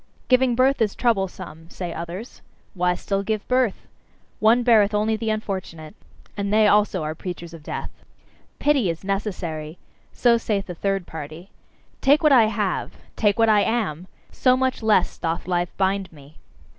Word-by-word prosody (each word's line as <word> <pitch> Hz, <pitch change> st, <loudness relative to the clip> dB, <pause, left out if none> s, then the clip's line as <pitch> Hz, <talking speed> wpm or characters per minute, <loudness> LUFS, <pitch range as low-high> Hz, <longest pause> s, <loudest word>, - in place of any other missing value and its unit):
"Giving 255 Hz, -1 st, +4 dB
birth 260 Hz, +1 st, +2 dB
is 210 Hz, -2 st, +1 dB
troublesome," 190 Hz, -7 st, -2 dB
say 175 Hz, -2 st, -6 dB
others 175 Hz, +8 st, -7 dB, 0.3 s
"why 180 Hz, -2 st, +1 dB
still 195 Hz, +2 st, -2 dB
give 215 Hz, +1 st, -3 dB
birth? 250 Hz, -5 st, 0 dB, 0.5 s
One 230 Hz, +3 st, +4 dB
beareth 215 Hz, -3 st, +4 dB
only 215 Hz, +1 st, +1 dB
the 220 Hz, 0 st, -3 dB
unfortunate!" 190 Hz, -7 st, -4 dB, 0.4 s
And 200 Hz, -1 st, -2 dB
they 215 Hz, 0 st, +5 dB
also 205 Hz, -4 st, +2 dB
are 155 Hz, +1 st, -3 dB
preachers 170 Hz, 0 st, -7 dB
of 165 Hz, -, -10 dB
death. -, -, -6 dB, 0.7 s
"Pity 280 Hz, -10 st, +2 dB
is 165 Hz, +2 st, -4 dB
necessary," 180 Hz, -6 st, -4 dB, 0.3 s
so 235 Hz, -2 st, +3 dB
saith 205 Hz, -3 st, -2 dB
a -, -, -5 dB
third 195 Hz, +1 st, -2 dB
party. 160 Hz, +4 st, -9 dB, 0.5 s
"Take 285 Hz, +4 st, +4 dB
what 305 Hz, -, +5 dB
I 245 Hz, -5 st, +7 dB
have! 210 Hz, -5 st, -2 dB, 0.2 s
Take 210 Hz, -2 st, +2 dB
what 225 Hz, -1 st, +4 dB
I 210 Hz, -2 st, +5 dB
am! 195 Hz, -7 st, -1 dB, 0.2 s
So 255 Hz, -1 st, +3 dB
much 260 Hz, -1 st, -1 dB
less 215 Hz, -4 st, +2 dB
doth 165 Hz, +1 st, -3 dB
life 175 Hz, -1 st, 0 dB
bind 195 Hz, 0 st, 0 dB
me!" 145 Hz, -1 st, -17 dB
200 Hz, 160 wpm, -23 LUFS, 175-225 Hz, 0.7 s, I